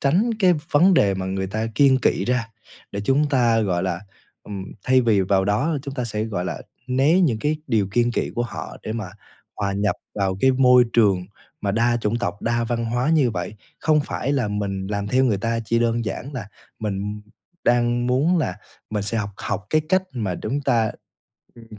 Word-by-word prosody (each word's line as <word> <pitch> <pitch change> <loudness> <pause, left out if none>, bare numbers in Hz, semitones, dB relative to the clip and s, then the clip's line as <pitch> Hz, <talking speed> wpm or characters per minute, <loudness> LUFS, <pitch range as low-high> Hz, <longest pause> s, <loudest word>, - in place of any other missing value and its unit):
tránh 180 - +2
cái 185 -4 +5 0.2
vấn 180 +6 +5
đề 100 -10 +4
mà 95 0 -3
người 95 0 -2
ta 110 +4 -2
kiêng 135 0 +5
kỵ - - +1
ra 125 -2 0 0.4
để 100 - -3
chúng 140 +5 +2
ta, 120 -5 +3
gọi 90 -5 0
là, 90 -2 -2 0.4
ừm, 100 -2 -6 0.2
thay 130 0 +4
vì 115 -5 +3
vào 95 0 +2
đó 120 +11 +1
chúng 140 -1 -6
ta 125 -3 -2
sẽ, 110 -2 -2
gọi 100 -5 -3
là, - - -4 0.2
né 135 +8 +3
những 135 -12 +2
cái 150 +7 0
điều 105 -4 +1
kiêng 120 +2 +2
kỵ - - -1
của 120 - 0
họ, 120 - -6
để 110 - -4
mà 110 -5 -4 0.5
hòa 100 -2 -1
nhập 100 +1 0 0.2
vào 95 -2 0
cái 130 +3 +5
môi 125 -1 +6
trường 100 -6 +3 0.3
mà 100 - -1
đa 120 +2 +2
chủng 110 +1 0
tộc, 110 -3 -3
đa 120 0 +1
văn 115 0 -2
hóa 120 +5 0
như 150 -7 +3
vậy. 95 +1 -4 0.3
Không 155 -1 +3
phải 140 - -2
là 130 -7 0
mình 100 -2 -3
làm 100 0 -2
theo 130 +4 +3
người 110 -6 +1
ta 115 +2 -1
chỉ 115 +1 +1
đơn 115 0 +1
giản 115 +7 -5
là 115 -7 -6 0.3
mình 105 0 -3 0.4
đang 120 0 +2
muốn 145 +8 +2
là 95 - -1 0.3
mình 105 -1 -1
sẽ 105 +3 -1
học 100 -2 -3
học 100 - -4
cái 155 - +4
cách 185 +1 +3
mà 105 -8 -2
đúng 130 +10 -3
ta 115 -5 +1 0.6
ừm, 115 -1 -14
115 Hz, 210 wpm, -22 LUFS, 100-130 Hz, 0.6 s, môi